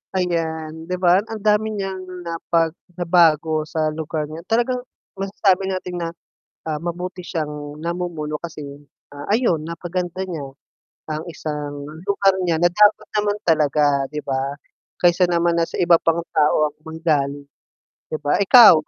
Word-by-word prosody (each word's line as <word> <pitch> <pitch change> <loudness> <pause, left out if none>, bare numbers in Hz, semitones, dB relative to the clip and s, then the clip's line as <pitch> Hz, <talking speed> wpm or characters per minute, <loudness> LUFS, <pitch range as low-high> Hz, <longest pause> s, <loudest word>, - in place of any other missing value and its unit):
Ayan, 160 -3 -1
'di 180 - -1
ba 180 +1 +5
ang 220 -1 -5
dami 215 +1 +2
niyang 195 -2 -4 0.2
napag 165 -1 0 0.3
nabago 165 -3 +3
sa 155 0 -1
lugar 155 -1 -3
niya. 160 +2 -8
Talagang 245 +2 +1 0.3
masasabi 195 -1 +1
natin 180 -1 -4
na, 165 - -2 0.6
ah, 150 -1 -2
mabuti 180 +2 -4
siyang 150 -4 -5
namumuno 170 -3 -3
kasi, 160 -3 -7 0.5
ah, 145 0 -8
ayun 210 -9 +2
napaganda 175 +1 -3
niya 165 -6 -5 0.7
ang 155 +1 -3
isang 150 -3 -5 0.3
lugar 200 -1 +3
niya 170 -2 +1
na 175 - +5
dapat 210 +3 +4
naman 205 0 0
talaga, 150 -2 +3 0.2
'di 150 +2 -5
ba? 135 +1 -2 0.5
Kaysa 175 +1 +4
naman 170 -1 +2
na 165 - +3
sa - - -8
iba 175 -1 +6
pang 165 +1 +1
tao 150 0 +3
ang 145 - -37
manggaling, 145 -3 -1 0.6
'di 155 - -2
ba. 145 - +2
Ikaw? 225 +4 +9
170 Hz, 145 wpm, -21 LUFS, 155-185 Hz, 0.7 s, Ikaw